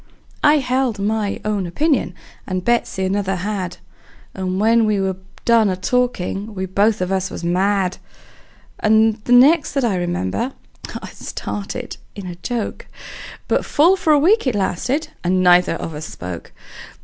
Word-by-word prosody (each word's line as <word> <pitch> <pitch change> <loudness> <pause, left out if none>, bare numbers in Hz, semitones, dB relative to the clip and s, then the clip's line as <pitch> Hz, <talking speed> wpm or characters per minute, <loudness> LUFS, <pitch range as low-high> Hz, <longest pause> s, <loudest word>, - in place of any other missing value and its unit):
I 295 +1 +6
held 255 -4 0
my 205 0 -1
own 205 -4 -1
opinion, 295 - 0 0.3
and 185 -1 -3
Betsey 235 -5 +1
another 195 0 0
had; 185 -1 -3 0.6
And 185 0 -2
when 225 +2 +4
we 210 -2 +1
were 190 -1 -1 0.3
done 230 -3 +4
a 185 - 0
talkin', 210 -1 -1
we 190 0 -2
both 205 +3 +1
of 180 +1 -1
us 190 -1 0
was - - -7
mad. 185 +2 +1 0.8
And 220 0 +3
the - - -2
next 285 +6 +6
that 275 - 0
I 215 -5 +1
remember, 175 - -2 0.5
it - - -6
started 210 +4 -6 0.2
in 200 -2 -7
a 180 - -5
joke; 220 +6 -4 0.6
But - - +1
full 335 +6 +4
for 330 -4 +1
a 300 - +6
week 355 +4 +3
it 250 - +1
lasted, 250 - -1
and 185 +1 +2
neither 180 -1 +5
of 165 - -5
us 155 +1 -6
spoke. 90 -1 -8
205 Hz, 160 wpm, -20 LUFS, 185-245 Hz, 0.8 s, I